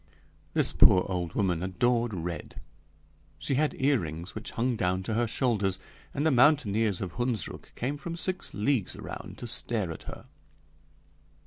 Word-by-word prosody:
This - - +3
poor 90 - +6
old 90 -3 -2
woman 90 -5 +1
adored 120 +6 +1
red; 85 -4 -5 0.8
she 140 - -2
had 150 +3 +1
earrings 90 - 0
which 110 - -6
hung 120 +1 0
down 95 -3 0
to 110 - -2
her 120 +2 +2
shoulders, 105 -6 +1 0.3
and 145 +2 -1
the 160 - +5
mountaineers 115 - +4
of 95 -3 -3
Hundsrück 120 -7 -2
came 135 +4 -2
from 170 +3 -5
six 185 +2 -2
leagues 110 -1 +1
around - - -7
to - - -7
stare 110 -5 -2
at 80 - -8
her. - - -9
110 Hz, 150 wpm, -29 LUFS, 95-130 Hz, 0.8 s, poor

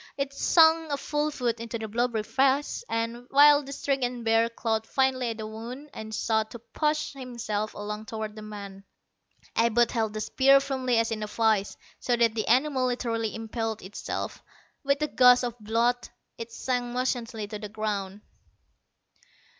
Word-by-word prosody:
It 275 0 -2
sank 320 +1 +4
a 285 - 0
full 295 +2 -1
foot 240 -5 -2
into 230 0 -4
the 220 -1 -5
blubbery 230 0 0
flesh, 270 - +1
and, 230 +2 -3
while 290 +1 +7
the 275 -1 -9
stricken 255 -4 -2
bear 225 0 +3
clawed 225 -1 -2
vainly 260 -2 +1
at 225 - -4
the 220 - -5
wound 240 +7 -8
and 220 0 -7
sought 220 0 0
to - - -8
push 300 +6 -2
himself 235 -5 -4
along 210 +1 -6
toward 220 -1 -5
the 215 - -8
man, 200 -2 -9 0.7
Abud 235 +1 +3
held 220 -3 -1
the 215 - -3
spear 275 +5 +5
firmly 260 -3 -1
as 230 0 +1
in 220 -1 -3
a 210 - -3
vise, 215 -2 +1 0.2
so 245 - +1
that 235 -2 +3
the 220 -1 -2
animal 260 +1 +3
literally 230 -3 -2
impaled 225 -1 -4
itself. 190 +3 -5 0.4
With 280 +1 +1
a - - +1
gush 250 -2 +6
of 240 -1 -4
blood, 230 +3 0 0.3
it 230 0 -8
sank 245 0 -2
motionless 250 -1 -1 0.2
to 210 - -5
the 210 -1 -7
ground. 205 -2 -3
235 Hz, 170 wpm, -27 LUFS, 220-260 Hz, 0.7 s, while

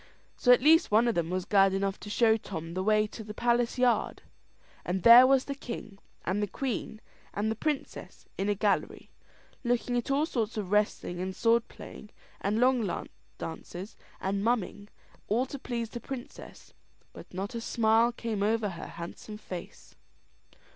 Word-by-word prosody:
So 245 - +3
at 250 +1 +6
last 325 +3 +6
one 220 +3 +4
of 235 - +2
them 170 -3 -1
was 185 0 -2
glad 195 -1 +4
enough 195 0 -1
to 205 - -9
show 220 +1 +4
Tom 165 -6 -6
the 185 - -2
way 215 +2 +3
to 220 +1 -9
the 210 0 -9
palace 240 +1 +1
yard; 250 -1 +1 0.6
and 185 +1 -2
there 240 +2 +10
was 270 -1 +3
the 280 - -3
king, 235 -6 -8 0.3
and 190 +4 0
the 205 - 0
queen, 225 0 -4 0.4
and 215 +2 0
the - - -2
princess, 295 +4 -4
in 195 +2 -1
a 205 - +2
gallery, 200 0 -1 0.5
looking 245 0 0
at 240 - -3
all 280 +3 +2
sorts 230 -8 -2
of 200 -3 -4
wrestling, 210 -4 0
and 185 +1 -4
sword 230 +2 +2
playing, 210 - -11 0.3
and 210 +3 0
long 245 -6 +1 0.3
dances, 175 +4 -7 0.2
and 195 +1 -2
mumming, 210 -3 -1 0.4
all 235 +5 +1
to 275 +1 -8
please 235 -3 -4
the 240 - -5
princess; 255 +1 -9 0.4
but - - -12
not 195 +5 -5
a 230 - -4
smile 225 +1 +3
came 230 -3 -4
over 215 0 +1
her 170 - -7
handsome 175 +5 -8
face. 185 -4 -9
220 Hz, 175 wpm, -29 LUFS, 195-240 Hz, 0.6 s, there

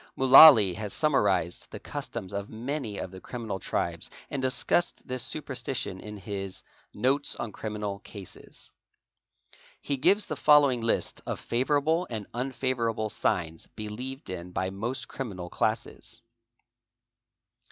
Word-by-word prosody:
Mudllaly 130 - +9
has 105 -2 -5
summarised 100 - +1
the - - -8
customs 95 +1 -6
of 100 0 -4
many 115 -1 -4
of 90 - -5
the 95 -1 -11
criminal 115 -6 -5
tribes - - -3 0.2
and 140 - -2
discussed 130 +6 +1
this 130 -1 -2
superstition 130 -8 -3
in 105 +1 -8
his 95 -1 -6 0.3
'Notes 135 +6 +1
on 115 - -5
Criminal 105 -2 -4
Classes." 100 -2 -12 1.1
He 140 - -2
gives 190 +10 +3
the - - -4
follow 150 -2 +6
ing 125 -2 -2
list 115 - -1
of - - -3
favourable 145 +7 +1
and 110 -3 -4
unfavourable 120 -3 -1
signs 80 -2 -2
believed 120 +4 -6
in 90 -1 -6
by 95 +1 -2
most 115 +7 -4
criminal 95 -9 -6
classes. 115 +1 -3
115 Hz, 130 wpm, -28 LUFS, 100-135 Hz, 1.1 s, Mudllaly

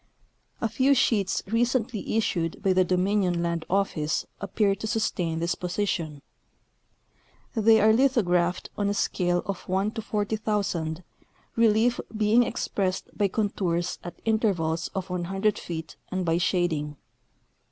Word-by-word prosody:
A 230 - +2
few 260 +5 +3
sheets 200 -7 +1
recently 230 0 0
issued 170 -6 -1
by 190 -2 +3
the 185 0 +4
Dominion 180 -1 +1
land 170 -1 -2
office 175 -6 0 0.2
ap 200 -2 -7
pear 205 -2 +3
to 210 +3 -5
sustain 180 -7 -1
this 170 +1 0
position. 175 -5 -3 1.3
They 220 -1 +5
are 220 +1 +5
lithographed 185 -9 +2
on 205 -1 0
a 205 - -1
scale 175 -3 0
of 195 -3 -5
1: 190 +3 +1
40,000, 205 -6 -2 0.5
relief 230 +1 +3 0.2
being 215 +3 +4
expressed 200 -5 -2
by 205 - +2
contours 185 -4 -1
at 175 - -8
intervals 185 -8 +1
of 190 -1 -4
100 195 +4 0
feet 160 -2 -6
and 185 -1 -2
by 165 0 +2
shading. 160 -5 0
195 Hz, 130 wpm, -26 LUFS, 175-215 Hz, 1.3 s, They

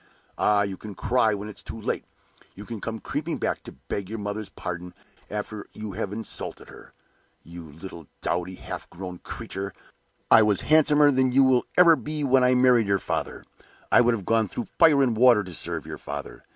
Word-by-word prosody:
Ah, 105 -1 +3
you 100 -2 -4
can 105 0 -9
cry 110 0 +2
when 100 +1 -6
it's 105 - -8
too 115 - -8
late; 105 - -3 0.5
you 105 - -9
can 115 -3 -7
come 115 0 -4
creeping - - -3
back - - -2
to - - -11
beg 100 -2 -3
your 110 - -4
mother's 105 0 -4
pardon 90 -1 -6 0.3
after 105 0 -5
you 110 -1 -6
have 100 0 -4
insulted 110 0 -6
her. - - -14 0.5
You 85 -2 -11
little 85 0 -10
dowdy, 90 +1 -2
half - - -8
grown 90 0 -8
creature! 100 0 -6 0.6
I - - +9
was 105 -2 +2
handsomer 150 -1 +5
than 130 -1 +3
ever 125 - -3
you 135 - +7
will 145 +6 +5
be 150 +2 -2
when 130 -1 +4
I 125 0 +4
married 125 -3 +4
your 100 0 +3
father. - - -4 0.5
I - - +7
would 120 -1 +3
have 100 -5 -7
gone 115 0 +2
through 115 - -6
fire 155 -5 +6
and 120 -4 +1
water 120 -2 +5
to 90 -2 -8
serve - - -3
your - - -7
father! - - -7
110 Hz, 195 wpm, -25 LUFS, 95-125 Hz, 0.6 s, I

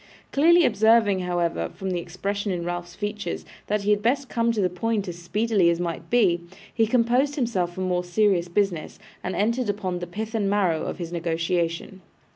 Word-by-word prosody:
Clearly 335 +4 +5
observing, 220 -2 +4
however, 175 - -1
from 190 -1 -4
the 180 - -1
expression 200 +4 -3
in 175 -2 -3
Ralph's 175 0 -4
features, 205 +1 -4 0.2
that 210 0 0
he 205 - +2
had 205 0 +2
best 260 +4 +1
come 235 0 +1
to 225 - -2
the 190 - +3
point 205 +3 -2
as 175 -1 -6
speedily 200 +1 +2
as 170 0 +1
might 170 -2 -4
be, 195 -8 +3 0.3
he 225 -1 +2
composed 250 +5 +2
himself 190 - -1
for 185 - -4
more 180 -1 0
serious 180 -1 +2
business, 175 -3 -1 0.3
and 185 - -3
entered 230 +3 0
upon 190 -3 -2
the 175 - -5
pith 215 +5 -5
and 205 -3 0
marrow 185 -6 +1
of - - -4
his 170 -2 -5
negotiation. 170 +2 -2
195 Hz, 190 wpm, -25 LUFS, 175-220 Hz, 0.3 s, Clearly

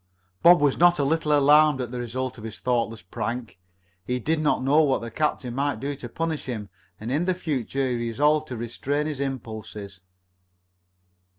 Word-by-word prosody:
Bob 175 +1 +8
was 145 -2 +2
not 175 0 +6
a 145 - +1
little 155 +2 +1
alarmed 150 0 +5
at 125 -2 -4
the 125 - -4
result 125 +1 -4
of - - -11
his 110 -1 -7
thoughtless 115 -4 -1
prank. 115 +3 -5 0.4
He 125 +6 -1
did 155 +6 0
not 150 -4 +1
know 145 +4 +4
what 140 -4 +2
the 115 0 -6
captain 130 -2 -1
might 140 -2 -1
do 140 +3 -3
to 120 -3 -8
punish 160 +3 -3
him, 110 -5 -5 0.3
and 115 +3 -5
in 155 +6 +1
the 185 0 +1
future 135 -5 -2
he 125 -1 -1
resolved 150 +7 +1
to 125 - -6
restrain 135 +6 -2
his 150 -3 -4
impulses. 110 -7 -6
130 Hz, 185 wpm, -25 LUFS, 115-150 Hz, 0.4 s, Bob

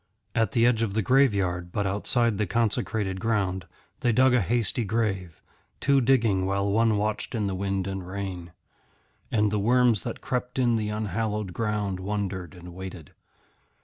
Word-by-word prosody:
At 115 -1 +1
the 115 -2 +4
edge 120 -2 +3
of 105 -3 -1
the 110 - +1
graveyard, 95 -9 +2
but 100 +2 -1
outside 105 +3 +1
the 105 - +1
consecrated 105 -2 0
ground, 95 -5 -1 0.3
they 120 - +2
dug 130 +3 +4
a 125 - +4
hasty 115 - 0
grave, 95 -6 -2 0.4
two 140 -1 +3
digging 115 -7 +2
while 100 +1 0
one 110 0 +3
watched 105 +4 -2
in 110 -2 0
the 100 - -1
wind 95 0 -2
and 95 -2 -5
rain. 95 -3 -5 0.8
And 105 -2 +2
the 105 - 0
worms 120 -1 +3
that - - -5
crept 125 0 -3
in 120 -2 +3
the 105 -2 -1
unhallowed 105 -1 -2
ground 105 -3 -2
wondered 95 -2 -4
and 90 0 -11
waited. 90 -4 -8
105 Hz, 165 wpm, -26 LUFS, 95-115 Hz, 0.8 s, the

